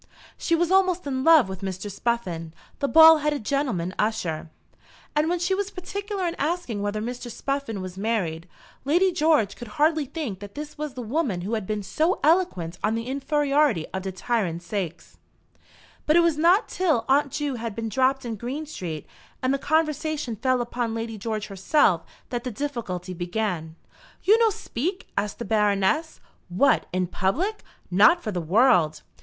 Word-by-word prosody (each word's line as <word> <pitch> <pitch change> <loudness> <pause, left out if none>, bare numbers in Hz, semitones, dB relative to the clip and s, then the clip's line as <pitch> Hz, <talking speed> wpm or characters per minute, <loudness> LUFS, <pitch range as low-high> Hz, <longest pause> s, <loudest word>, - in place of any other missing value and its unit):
She 335 - +1
was 345 +1 +1
almost 370 -2 +3
in 260 -2 -2
love 320 -7 +6
with 190 0 -7
Mr. 190 +1 -4
Spuffin, 185 -8 -3 0.2
the 280 - +1
bald 320 +1 +8
headed 295 -6 -1
gentleman 225 -11 -1
usher; 175 -8 -1 0.7
and 300 +2 +2
when 355 - +1
she 350 +2 0
was 400 +1 -1
particular 400 +1 -4
in 335 - -2
asking 295 - -2
whether 205 +1 -2
Mr. 245 +1 -5
Spuffin 275 -4 -3
was 185 0 -7
married, 180 -7 -1 0.4
Lady 350 +7 +3
George 305 - +2
could 240 - -9
hardly 310 0 +3
think 265 - -5
that 200 0 -10
this 300 0 -7
was 300 -3 -5
the 250 - -5
woman 235 - -1
who 200 +6 -4
had 215 -4 -2
been 210 -1 -2
so 320 - 0
eloquent 290 - +1
on 215 +1 +1
the 230 0 -3
"infairiority 280 - +1
of 190 - -2
de 190 0 -4
tyrant 185 -3 -2
saix." 175 -2 -5 0.9
But 305 - +4
it 345 - +7
was 335 -2 +3
not 345 +8 +4
till 320 -10 +1
Aunt 280 +1 +3
Ju 295 0 -2
had 225 -2 -5
been 225 0 -3
dropped 260 +4 +1
in 225 -2 -4
Green 260 +8 -4
Street, 170 - -6 0.4
and 255 +1 +2
the 275 - 0
conversation 305 -4 0
fell 255 +3 +1
upon 240 -1 -2
Lady 225 -1 -4
George 215 0 -3
herself, 195 - +2 0.3
that 240 -1 -2
the 255 - -3
difficulty 215 -8 -4
began. 175 -2 -3 0.5
"You 430 +4 +5
no 455 -1 +5
speak?" 365 - -4
asked 210 0 -2
the 235 - -5
Baroness. 210 +8 +1 0.3
"What, 235 +11 +3
in 185 0 0
public! 290 - -1 0.3
Not 210 - +5
for 215 - -2
the 180 -3 -2
world!" 170 - +3
240 Hz, 175 wpm, -25 LUFS, 195-305 Hz, 0.9 s, bald